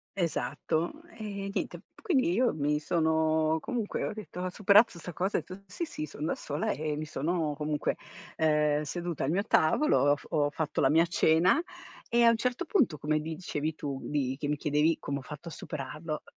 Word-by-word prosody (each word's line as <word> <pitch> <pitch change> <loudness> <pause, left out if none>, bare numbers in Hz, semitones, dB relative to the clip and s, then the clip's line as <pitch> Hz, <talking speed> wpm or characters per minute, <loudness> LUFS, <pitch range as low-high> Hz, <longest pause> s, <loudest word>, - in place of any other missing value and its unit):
Esatto. 165 - -1
E 200 -3 -5
niente, - - -2
p - - -22
quindi 280 - +2
io 240 +6 +2
mi 150 0 0
sono 160 0 +2
comunque 230 +3 -3
ho - - -3
detto 205 -5 -8
ho 185 0 -1
superato 200 +1 +5
sta 175 +1 -7
cosa 190 +6 0
e - - 0
ho - - -21
detto: 195 - -17
"Sì, 335 - -4
sì, 155 - -5
son 150 0 -6
da - - +1
sola", 145 +1 -2
e 150 +2 -2
mi 155 - -4
sono 155 0 -1
comunque, 150 0 -1 0.4
ehm, 150 -1 +3
seduta 170 0 -3
al - - -1
mio 195 +3 +1
tavolo, 225 - +3
ho - - +4
f - - -15
ho 145 -2 +2
fatto 150 +1 -2
la 135 - +4
mia 165 +2 +5
cena 175 - +4 0.5
e 235 0 +4
a 235 - +8
un 230 - +3
certo 250 +8 -1
punto 265 - +2
come 150 +1 0
dicevi 155 -1 -3
tu 140 -3 -4
di 135 -3 -1
che 145 - -2
mi 150 - +1
chiedevi 150 +3 +2
come 140 0 -3
ho - - -9
fatto 150 +5 -8
a - - -10
superarlo, 150 +1 -5
160 Hz, 205 wpm, -29 LUFS, 150-190 Hz, 0.5 s, a